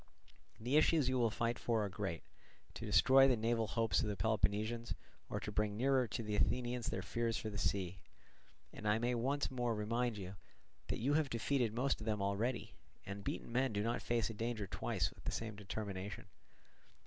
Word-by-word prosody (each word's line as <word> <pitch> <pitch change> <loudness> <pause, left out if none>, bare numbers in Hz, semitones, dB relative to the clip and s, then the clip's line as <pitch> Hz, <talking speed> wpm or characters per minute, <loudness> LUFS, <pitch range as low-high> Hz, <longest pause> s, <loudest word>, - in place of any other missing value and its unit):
The 125 +6 +2
issues 155 -3 +4
you 130 -1 +1
will 115 -2 +4
fight 115 +2 -1
for 115 -2 +1
are - - -3
great—to 95 -3 -7
destroy 135 +1 +7
the 125 -3 +3
naval 115 0 +1
hopes 115 +2 +2
of 115 - -1
the 105 - -1
Peloponnesians 110 +3 0 0.3
or - - -2
to - - -5
bring 105 -1 0
nearer 130 0 +3
to 115 - -3
the 105 -1 -2
Athenians 120 +1 +1
their 95 - -2
fears 115 +2 -1
for 110 - -4
the 100 - -4
sea. 95 -2 -1 0.7
And 105 - -5
I 105 +1 +4
may 120 +2 +1
once 135 +5 0
more 120 -3 0
remind 115 +2 0
you 95 0 -7 0.5
that - - -1
you 135 +6 +1
have 150 -2 +2
defeated 120 0 +1
most 130 0 +1
of - - -5
them 105 -1 +1
already; 100 +5 -1 0.3
and 100 0 -6
beaten 90 - -4
men 130 0 +1
do 105 0 0
not 120 +2 0
face 115 -2 0
a - - -7
danger 115 -1 -2
twice - - -1
with - - -17
the - - 0
same 110 -2 -4
determination." 100 -1 -5
115 Hz, 195 wpm, -37 LUFS, 105-120 Hz, 0.7 s, destroy